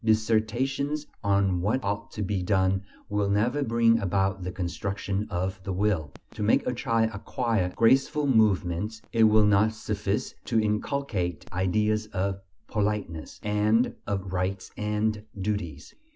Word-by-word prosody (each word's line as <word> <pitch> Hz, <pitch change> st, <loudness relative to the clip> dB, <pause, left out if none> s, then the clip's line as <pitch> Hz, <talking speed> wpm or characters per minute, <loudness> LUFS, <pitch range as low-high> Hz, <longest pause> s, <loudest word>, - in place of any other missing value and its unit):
Dissertations 115 Hz, +7 st, +1 dB, 0.2 s
on 100 Hz, -3 st, +2 dB
what 110 Hz, +8 st, 0 dB
ought 100 Hz, +1 st, -2 dB
to 105 Hz, -, -3 dB
be 100 Hz, -1 st, -1 dB
done 95 Hz, 0 st, +2 dB, 0.3 s
will 105 Hz, -2 st, 0 dB
never 115 Hz, +8 st, +1 dB
bring 115 Hz, -2 st, +3 dB
about 95 Hz, 0 st, 0 dB
the 90 Hz, 0 st, -4 dB
construction 95 Hz, +3 st, -3 dB
of 95 Hz, +2 st, -2 dB
the 95 Hz, -, -3 dB
will; 90 Hz, -7 st, 0 dB, 0.2 s
to -, -, -8 dB
make 105 Hz, +2 st, +3 dB
a 125 Hz, -, 0 dB
child 115 Hz, -2 st, +1 dB
acquire 105 Hz, -2 st, -1 dB
graceful 135 Hz, +5 st, +3 dB
movements, 105 Hz, -3 st, +1 dB
it 115 Hz, -1 st, +5 dB
will 110 Hz, -1 st, +5 dB
not 105 Hz, +2 st, +4 dB
suffice 105 Hz, -2 st, -2 dB
to 115 Hz, -, +2 dB
inculcate 105 Hz, -, -1 dB
"ideas 105 Hz, +4 st, +1 dB
of 95 Hz, -1 st, -2 dB, 0.3 s
politeness" 105 Hz, -7 st, -2 dB
and 105 Hz, +3 st, +2 dB
of 95 Hz, -2 st, -3 dB
"rights 95 Hz, +1 st, -2 dB
and 105 Hz, 0 st, -1 dB, 0.2 s
duties." 95 Hz, -7 st, -3 dB
105 Hz, 135 wpm, -27 LUFS, 95-110 Hz, 0.3 s, it